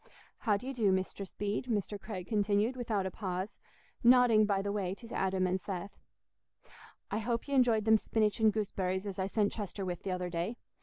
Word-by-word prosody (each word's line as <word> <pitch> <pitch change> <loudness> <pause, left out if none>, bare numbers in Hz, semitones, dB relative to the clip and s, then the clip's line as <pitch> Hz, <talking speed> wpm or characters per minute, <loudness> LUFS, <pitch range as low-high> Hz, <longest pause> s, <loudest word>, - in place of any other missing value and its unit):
How 210 -4 +2
do 210 - -10
ye 270 - -3
do, 220 -6 +2
Mistress 190 +1 -2
Bede?" 205 +4 -2
Mr. 205 -3 -2
Craig 190 -5 -6
continued, 210 +3 +1
without 225 -6 -1
a 190 - -2
pause, 185 +1 -4 0.4
nodding 240 -3 +6
by 195 -1 +1
the 200 - -1
way 195 -2 -2
to 230 +3 -10
Adam 190 -1 +1
and 185 +1 0
Seth. 190 0 -6 1.1
"I 215 - 0
hope 230 +3 -2
y' - - -7
enjoyed 235 -5 +4
them 220 0 +6
spinach 215 0 0
and 220 -1 +5
gooseberries 190 -2 -2
as 195 -2 -5
I 190 - 0
sent 205 0 +1
Chester 200 -2 -4
with 180 -2 -4
th' - - -8
other 180 -1 -2
day. 175 +8 -2
205 Hz, 200 wpm, -32 LUFS, 190-220 Hz, 1.1 s, nodding